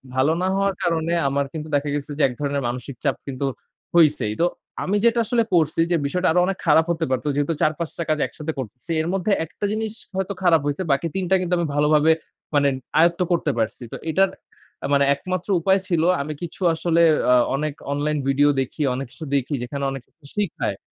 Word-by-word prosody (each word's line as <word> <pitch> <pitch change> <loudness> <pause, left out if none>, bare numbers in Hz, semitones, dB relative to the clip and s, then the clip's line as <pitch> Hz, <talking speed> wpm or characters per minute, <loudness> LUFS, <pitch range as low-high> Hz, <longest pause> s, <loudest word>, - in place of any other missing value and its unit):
ভালো 135 +4 +3
না - - +1
হওয়ার 195 0 +1
কারণে 165 -1 0 0.2
আমার 140 +1 0
কিন্তু 155 -1 -5
দেখা 145 +1 0
গেছে 145 0 -4
যে, 155 - -1
এক 125 - -5
ধরনের 140 -1 -1
মানসিক 125 +2 -5
চাপ 140 -3 +1
কিন্তু 135 0 -3 0.5
হইছেই। 150 -10 +4
তো - - +5 0.4
আমি 200 +2 +1
যেটা 235 0 +4
আসলে 230 +1 +2
করছি 160 -2 +2
যে, - - +4
বিষয়টা 180 +6 0
আরো 180 - +3
অনেক 195 0 -2
খারাপ 160 +1 +5
হতে 165 -1 -1
পারত। 130 -2 0
যেহেতু 145 +3 +1
৪-৫ 155 +1 0
টা 170 - -1
কাজ 155 - +2
একসাথে 155 0 -5
করতেছি। 125 +6 -7
এর 160 - -3
মধ্যে 195 +2 0
১ 160 - -9
টা 205 - 0
জিনিস 220 0 -2 0.2
হয়তো 190 +1 -1
খারাপ 165 -3 +5
হয়েছে। 145 +6 -1
বাকি 140 +5 +1
৩ 190 - -1
টা 190 - +5
কিন্তু 180 0 -1
আমি 170 -1 0
ভালোভাবে 150 +1 +4 0.4
মানে 145 -1 +4 0.3
আয়ত্ত 170 +1 +4
করতে 170 -3 +2
পারছি। 110 +2 -1
তো - - -5
এটার 190 +5 +3 0.5
অ্যা - - -3
মানে 140 0 +4
একমাত্র 185 +3 -4
উপায় 190 +3 +3
ছিল, 165 -3 +1 0.2
আমি 155 +2 -4
কিছু 175 +2 -7
আসলে 170 +1 +1 0.3
আ - - +7 0.2
অনেক 150 +1 -2 0.2
অনলাইন 150 +1 0
ভিডিও 140 +2 +4
দেখি, 130 +4 -5
অনেক 135 +1 -4
কিছু 160 - -9
দেখি, 140 +2 -1
যেখানে 140 +3 -4
অনেক 135 -1 -5
কিছু 160 - -26
শিখায়। 205 -5 -2
155 Hz, 210 wpm, -22 LUFS, 140-175 Hz, 0.5 s, আ